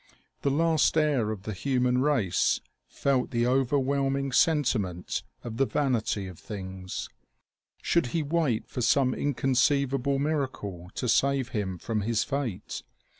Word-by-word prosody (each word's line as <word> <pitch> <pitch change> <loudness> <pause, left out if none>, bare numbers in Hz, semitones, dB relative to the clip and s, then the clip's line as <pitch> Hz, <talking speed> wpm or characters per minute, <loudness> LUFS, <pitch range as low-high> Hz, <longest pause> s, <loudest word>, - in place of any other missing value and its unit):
The 140 - +1
last 160 +2 +3
heir 145 -8 +2
of 105 -3 -5
the 110 - -4
human 125 +3 +1
race 130 -11 +2 0.3
felt 135 -3 0
the 120 0 +1
overwhelming 135 +1 +1
sentiment 115 - +1 0.2
of 115 -2 -6
the 135 - +2
vanity 120 -8 0
of 90 -3 -9
things. 95 -2 -6 0.8
Should 170 -7 +2
he 160 +6 -1
wait 145 -6 0
for 125 - -4
some 130 +1 +3
inconceivable 135 0 +1
miracle 130 - -2
to 125 - -2
save 135 +2 +2
him 95 -5 -2
from 110 +4 -2
his 110 +1 +1
fate? 135 -9 -3
130 Hz, 130 wpm, -28 LUFS, 110-140 Hz, 0.8 s, last